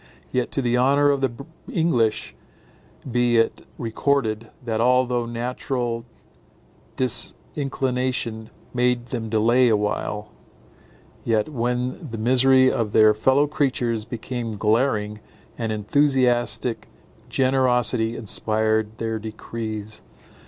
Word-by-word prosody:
Yet, 125 -1 -1
to 135 - -1
the 120 0 +1
honour 140 +3 +4
of 140 -1 -1
the 135 - +2 0.4
English 115 -11 +1 0.8
be 120 0 +2
it 115 - 0
recorded, 115 -2 -1 0.2
that, 110 -1 -1
although 125 -1 +2
natural 120 0 -3 0.9
disinclination 130 -3 -1 0.2
made 125 -1 +1
them 115 -3 -4
delay 120 +3 +3
awhile, 105 0 -1 0.9
yet 110 +2 +1
when 125 +5 -2
the 115 - -6
misery 130 +3 +4
of 110 -3 -2
their 110 -1 +6
fellow 130 +7 +3
creatures 125 -6 -1
became 120 -1 -5
glaring, 105 -1 +1 0.4
an 115 -1 -3
enthusiastic 125 +1 +1 0.4
generosity 125 -3 +2
inspired 110 0 0
their 115 -1 -2
decrees. 110 -1 -6
120 Hz, 100 wpm, -23 LUFS, 110-130 Hz, 0.9 s, their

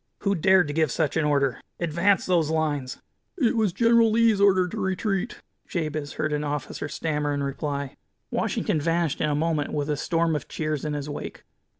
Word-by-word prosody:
Who 200 -1 +1
dared 190 -1 +4
to 145 - -3
give 155 -3 +1
such 155 +1 0
an 160 - +2
order? 140 -4 +1 0.2
Advance 170 +4 +2
those 170 -4 +2
lines 150 -5 -1 0.2
" - - -50
"It 250 -9 +2
was 220 -4 +2
General 230 +3 +4
Lee's 220 -2 +3
order 190 -2 +4
to 215 +4 -5
retreat," 190 +3 -1 0.3
Jabez 155 -4 -3
heard 155 -1 -2
an 150 0 -1
officer 145 -1 -3
stammer 150 -1 -2
in 140 - -2
reply. 140 0 -3 0.4
Washington 155 - 0
vanished 165 -1 0
in 150 - +1
a 145 - +1
moment, 155 -1 0
with 145 0 -1
a - - +1
storm 165 +1 +1
of 150 - -4
cheers 155 -2 -3
in 150 - -2
his 145 0 -4
wake. 145 - -7
155 Hz, 195 wpm, -25 LUFS, 145-190 Hz, 0.4 s, dared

